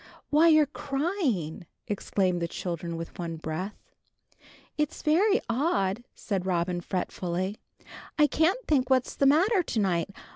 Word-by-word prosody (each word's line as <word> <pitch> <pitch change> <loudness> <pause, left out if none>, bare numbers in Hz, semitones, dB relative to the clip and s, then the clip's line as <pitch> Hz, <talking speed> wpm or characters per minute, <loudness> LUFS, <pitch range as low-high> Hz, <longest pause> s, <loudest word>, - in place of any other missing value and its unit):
"Why, 310 +3 +6
you're 310 -2 +6
crying!" 270 - -2 0.2
exclaimed 190 -3 0
the 170 - 0
children 170 -1 -4
with 165 +2 -8
one 170 -1 -3
breath. 160 +6 -4 1.0
"It's 300 -1 -2
very 390 +7 +4
odd," 230 - 0
said 195 -5 -2
Robin, 175 -1 0
fretfully. 185 +2 -3 0.6
"I 300 - +6
can't 340 +11 +1
think 270 -4 +2
what's 260 -2 +2
the 275 - +2
matter 365 +8 +4
to 245 -9 -2
night. 180 -3 +1
210 Hz, 135 wpm, -28 LUFS, -, 1.0 s, Why